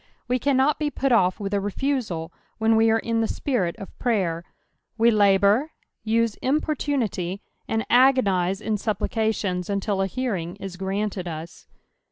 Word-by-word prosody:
We 250 +1 +1
can 275 +1 +1
not 275 +3 +2
be 300 -1 0
pat 275 -2 -1
off 185 -5 +3
with 200 -1 -4
a 200 - +2
refusal 205 -6 -2 0.3
when 225 0 +3
we 225 0 +4
are 225 - +4
in 230 0 -1
the 225 - +1
snirit 210 - -1
of 195 - -10
{traycr; 190 -9 0 0.6
we 230 +1 +5
Isboar, 205 +5 +4 0.4
use 225 0 +1
importunity, 260 - -1 0.3
■nd 225 0 0
agonise 205 -8 +3
in 215 -1 -1
aupplicatiDns 205 -3 -1
until 200 0 -1
a 195 - +1
Hearing 195 -7 -3
is 195 -2 -7
granted 195 0 -3
us. 165 0 -8
215 Hz, 155 wpm, -24 LUFS, 190-245 Hz, 0.6 s, we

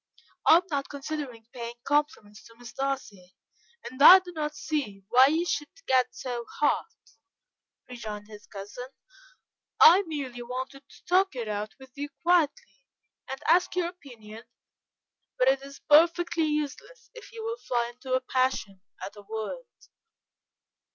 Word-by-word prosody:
"I - - +9
am 350 - 0
not 280 -1 -2
considering 280 -5 -6
paying 235 -1 -6
compliments 285 -8 -1
to 230 - -17
Miss 245 0 -12
Darcy, 260 -10 -4 0.5
and 255 +3 -8
I 365 +6 +12
do 365 -1 -7
not 300 -3 -4
see 220 -11 -4
why 255 +2 +7
you 320 +4 +1
should 295 -4 -2 0.2
get 255 -1 +2
so 245 -2 -5
hot," 295 - +1 1.0
rejoined 215 -4 -7
his 210 -1 -13
cousin. 205 +5 -8 0.9
"I 355 +5 +9
merely 270 -6 -5
wanted 260 +3 -7
to - - -19
talk 370 -2 +2
it 235 -3 -4
out 210 0 -4
with 265 -1 -14
you 290 +1 -5
quietly, 355 - +1 0.5
and 265 0 -5
ask 355 +3 +3
your 350 -1 0
opinion; 230 -10 -13 1.0
but 255 - +2
it 270 0 +3
is 275 0 -12
perfectly 335 +2 +4
useless 300 - -4
if 475 -4 -13
you 455 -1 -8
will 460 +1 -3
fly 240 - -2
into 255 +1 -6
a 260 - +1
passion 255 -7 -1 0.2
at 200 - -9
a 205 - -11
word." 220 - -6
270 Hz, 150 wpm, -27 LUFS, 235-315 Hz, 1.0 s, I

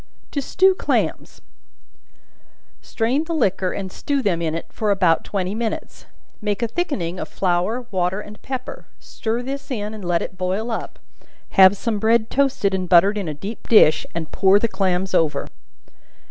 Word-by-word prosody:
To 285 - -1
Stew 380 +7 +3
Clams. - - -2 1.4
Strain 255 +7 -1
the 335 0 -3
liquor 190 - +1
and 190 -2 -5
stew 280 +5 -2
them 175 -6 0
in 160 -1 -1
it 165 - -4
for 215 - -1
about 185 -5 +3
twenty 190 -1 -2
minutes; 225 0 -4 0.3
make 210 +2 -1
a - - +1
thickening 205 - -3
of - - -4
flour, 190 +7 0
water 185 0 0
and 210 0 -11
pepper; 260 -1 -6
stir 230 +2 -4
this 275 +2 -6
in 215 -4 -3
and 215 -2 -8
let 175 -1 0
it 185 - -8
boil 190 +6 -1
up; 225 - -5 0.5
have 190 +1 +6
some 220 0 -2
bread 220 +1 +2
toasted 270 -8 +1
and 185 -2 -2
buttered 190 +4 +5
in 200 -4 -3
a 150 - -4
deep 200 +9 -8
dish, 210 -9 +5
and 160 -2 -4
pour 195 0 +4
the 230 - +1
clams 190 -2 -1
over. 160 -2 +1
205 Hz, 170 wpm, -21 LUFS, 185-235 Hz, 1.4 s, have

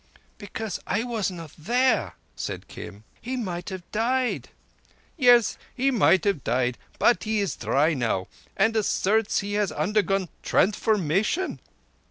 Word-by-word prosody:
"Because 205 0 -5
I 205 +5 0
was 230 -6 -1
not 165 -5 -8
there!" 235 - +1 0.2
said - - -5
Kim. 105 +2 -10 0.2
"He 255 +2 -4
might 180 -6 -4
have 190 -2 -6
died." 245 +3 0 0.7
"Yes, 245 -6 +5 0.2
he 270 +2 +2
might 200 -6 +4
have 200 -9 0
died, 125 +1 0 0.2
but 240 - +3
he 215 0 0
is 200 -2 -1
dry 150 +4 +2
now, 115 -8 -1 0.3
and 220 +3 +3
asserts 215 0 +1
he 200 +1 -4
has 205 -2 +1
undergone 195 -3 0
transfiguration." 210 - +1
205 Hz, 135 wpm, -25 LUFS, 175-230 Hz, 0.7 s, Yes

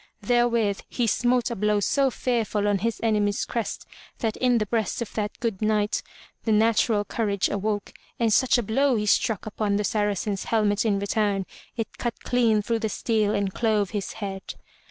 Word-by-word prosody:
'* - - -45
Therewith 235 -4 +2
he 245 - 0
smote 245 +2 +1
a - - -2
blow 210 0 +1
so 270 +7 +2
fearful 225 -5 -1
on 205 -1 +2
his 230 +3 -1
enemy's 210 -2 +1
crest 230 -3 -4 0.3
that 220 -2 -1
in 250 -2 +3
the 215 - 0
breast 220 -2 -1
of 235 - -5
that 210 -1 -3
good 225 -5 -2
Knight 215 -1 +1 0.4
the 225 - 0
natural 220 -1 +3
courage 200 -5 0
awoke, 205 0 -2 0.3
and 230 -2 +2
such 260 +2 +4
a 240 - 0
blow 265 +5 +2
he 210 -1 0
struck 210 0 +1
upon 210 -1 -1
the 210 - 0
Saracen's 205 -2 -1
helmet 210 -1 +1
in 205 -3 +2
return, 200 -1 0 0.3
it 225 -2 -5
cut 240 -1 -3
clean 230 -4 +2
through 230 +2 0
the 220 -1 -1
steel 215 -1 0
and 200 -2 -1
clove 215 -4 +1
his 205 -3 -3
head. 195 -3 -6
215 Hz, 185 wpm, -25 LUFS, 205-230 Hz, 0.4 s, such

